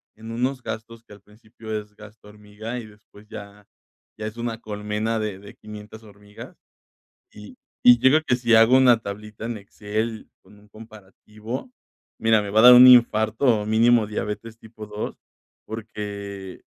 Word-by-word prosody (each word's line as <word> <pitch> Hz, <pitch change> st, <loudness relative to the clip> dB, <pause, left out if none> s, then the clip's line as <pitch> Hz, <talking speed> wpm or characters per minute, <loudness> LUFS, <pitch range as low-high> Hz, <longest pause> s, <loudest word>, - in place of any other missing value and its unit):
en 110 Hz, +1 st, -10 dB
unos 125 Hz, +3 st, -2 dB
gastos 115 Hz, +1 st, -8 dB
que -, -, -23 dB
al 100 Hz, -, -16 dB
principio 110 Hz, +1 st, -12 dB
es 105 Hz, 0 st, -15 dB
gasto 105 Hz, 0 st, -16 dB
hormiga, 105 Hz, +3 st, -9 dB
y 115 Hz, -, -9 dB
después 105 Hz, 0 st, -19 dB
ya 100 Hz, -1 st, -12 dB, 0.5 s
ya 110 Hz, 0 st, -5 dB
es 110 Hz, +2 st, -9 dB
una 115 Hz, -1 st, -4 dB
colmena 105 Hz, +2 st, -3 dB
de 105 Hz, -3 st, -4 dB
de 100 Hz, +1 st, -13 dB
500 105 Hz, +1 st, -12 dB
hormigas. 105 Hz, -1 st, -14 dB, 0.8 s
Y 105 Hz, +4 st, -13 dB, 0.3 s
y 120 Hz, -1 st, +8 dB
creo 140 Hz, +5 st, +4 dB
que 125 Hz, -, +1 dB
si 120 Hz, -2 st, +1 dB
hago 115 Hz, +3 st, +6 dB
una 125 Hz, -3 st, +5 dB
tablita 105 Hz, +1 st, -8 dB
en 120 Hz, -1 st, -4 dB
Excel 110 Hz, +2 st, -5 dB
con 105 Hz, -, -20 dB
un 105 Hz, 0 st, -22 dB
comparativo, 110 Hz, -, -10 dB, 0.5 s
mira, 110 Hz, -1 st, +3 dB
me 100 Hz, -, -6 dB
va 110 Hz, +2 st, +3 dB
a -, -, +4 dB
dar 125 Hz, 0 st, +10 dB
un 125 Hz, +1 st, +9 dB
infarto 120 Hz, -1 st, +4 dB, 0.2 s
o -, -, -7 dB
mínimo 115 Hz, +1 st, +3 dB
diabetes 110 Hz, +2 st, -6 dB
tipo 110 Hz, -1 st, -12 dB
2, 105 Hz, 0 st, -6 dB, 0.5 s
porque 100 Hz, -3 st, -8 dB
110 Hz, 165 wpm, -23 LUFS, 105-115 Hz, 0.8 s, dar